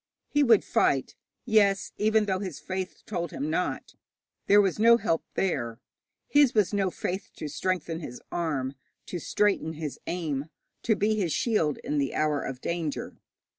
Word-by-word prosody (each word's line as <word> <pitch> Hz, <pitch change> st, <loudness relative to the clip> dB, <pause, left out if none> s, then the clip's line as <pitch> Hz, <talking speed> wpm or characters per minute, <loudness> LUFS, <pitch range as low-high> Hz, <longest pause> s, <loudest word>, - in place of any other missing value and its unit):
He 290 Hz, -, +2 dB
would 230 Hz, -7 st, +5 dB
fight 135 Hz, -2 st, +1 dB, 0.3 s
yes, 205 Hz, -4 st, +3 dB
even 215 Hz, 0 st, +3 dB
though 190 Hz, -2 st, 0 dB
his 185 Hz, -7 st, -5 dB
faith 185 Hz, -1 st, -5 dB
told 175 Hz, -5 st, -3 dB
him 150 Hz, +2 st, -3 dB
not. 180 Hz, +3 st, -2 dB, 0.5 s
There 205 Hz, -, +7 dB
was 195 Hz, -1 st, +2 dB
no 235 Hz, +1 st, +7 dB
help 165 Hz, -7 st, 0 dB
there. 120 Hz, -11 st, -1 dB, 0.5 s
His 290 Hz, -4 st, +4 dB
was 210 Hz, -2 st, +3 dB
no 195 Hz, -2 st, +2 dB
faith 185 Hz, +2 st, -4 dB
to 155 Hz, -, -5 dB
strengthen 165 Hz, +1 st, -2 dB
his 125 Hz, -7 st, -7 dB
arm, 145 Hz, -6 st, -1 dB, 0.3 s
to 175 Hz, -, -5 dB
straighten 195 Hz, -2 st, +1 dB
his 155 Hz, -2 st, -5 dB
aim, 155 Hz, -6 st, -2 dB, 0.4 s
to 220 Hz, -, +2 dB
be 210 Hz, +2 st, +2 dB
his 180 Hz, -6 st, 0 dB
shield 215 Hz, -, +1 dB
in 150 Hz, -, -1 dB
the 140 Hz, -2 st, -1 dB
hour 150 Hz, -2 st, +1 dB
of 130 Hz, -1 st, -5 dB
danger. 170 Hz, -4 st, -3 dB
180 Hz, 165 wpm, -27 LUFS, 150-205 Hz, 0.5 s, There